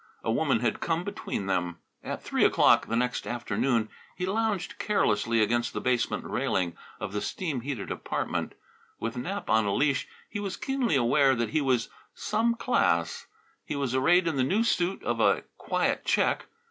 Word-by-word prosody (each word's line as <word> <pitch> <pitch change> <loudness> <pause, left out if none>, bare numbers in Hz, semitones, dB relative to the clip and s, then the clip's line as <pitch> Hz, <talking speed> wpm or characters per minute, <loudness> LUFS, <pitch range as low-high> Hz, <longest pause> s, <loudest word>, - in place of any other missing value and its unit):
A 115 - 0
woman 135 -2 +2
had 120 -3 0
come 165 +1 -1
between 200 - -4
them. 90 -2 -1 0.3
At - - -5
three - - +1
o'clock - - +5
the 115 - -1
next 125 +1 -1
afternoon 120 0 0 0.3
he 180 - -2
lounged 205 -2 -1
carelessly 115 - +2
against 120 +2 0
the - - -2
basement 125 -2 0
railing 85 -3 -1 0.2
of 95 - -5
the 105 - -1
steam 140 - -3
heated 130 -5 -4
apartment. - - -3 0.5
With 115 +2 -3
Nap 190 +12 -4
on 110 -1 +3
a 100 - +1
leash 140 -2 +1 0.2
he 205 - -5
was 200 -2 -4
keenly 270 - 0
aware 135 +2 +4
that 120 -1 -1
he 155 0 +2
was 130 -4 +1 0.3
"some 235 +2 +1
class." 85 - +1 0.4
He - - -4
was 140 -3 -1
arrayed 170 +7 +4
in 160 -4 0
the 130 - +3
new 200 - +2
suit 185 -4 0
of - - -1
a - - +3 0.2
quiet - - 0
check. - - +1
130 Hz, 175 wpm, -28 LUFS, 115-180 Hz, 0.5 s, o'clock